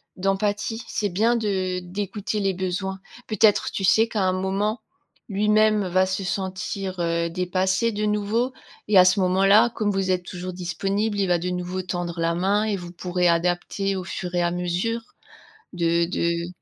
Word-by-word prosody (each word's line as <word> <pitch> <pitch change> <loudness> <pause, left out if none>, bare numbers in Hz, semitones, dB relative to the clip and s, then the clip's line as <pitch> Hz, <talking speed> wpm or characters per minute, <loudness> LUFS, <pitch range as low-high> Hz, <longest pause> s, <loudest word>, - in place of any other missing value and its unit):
d'empathie. 205 +4 -1
C'est 205 - -1
bien 220 +6 +2
de 190 -5 -1
d'écouter 200 +3 -4
les 195 -1 +1
besoins. 190 +1 -3 0.3
Peut-être, 215 -1 +3
tu 195 - -4
sais 220 +4 +4
qu'à 220 -3 -2
un 185 - +3
moment, 195 +4 -1 0.5
lui-même 210 0 +3
va 185 +1 +2
se 190 +1 -2
sentir, 190 0 -3
heu, 170 0 0
dépassé 185 +5 0
de 210 0 -2
nouveau 210 +4 0 0.3
et 210 -2 +4
à 185 - +10
ce 185 +2 +4
moment-là, 195 +5 +5
comme 210 -2 0
vous 195 -1 -1
êtes 180 -1 0
toujours 180 +1 -6
disponible, 195 +4 -2
il 195 - +2
va 175 -1 +3
de 175 +2 -3
nouveau 180 +1 -3
tendre 175 -2 -4
la 165 0 +1
main 195 +5 +1
et 215 -2 -1
vous 175 -1 -9
pourrez 180 0 0
adapter 175 +3 0
au 185 - -5
fur 180 +1 -5
et 175 - +2
à 175 0 +1
mesure, 180 +6 -1 0.7
de 170 -1 +2
de 170 -1 -1
190 Hz, 175 wpm, -24 LUFS, 180-205 Hz, 0.7 s, à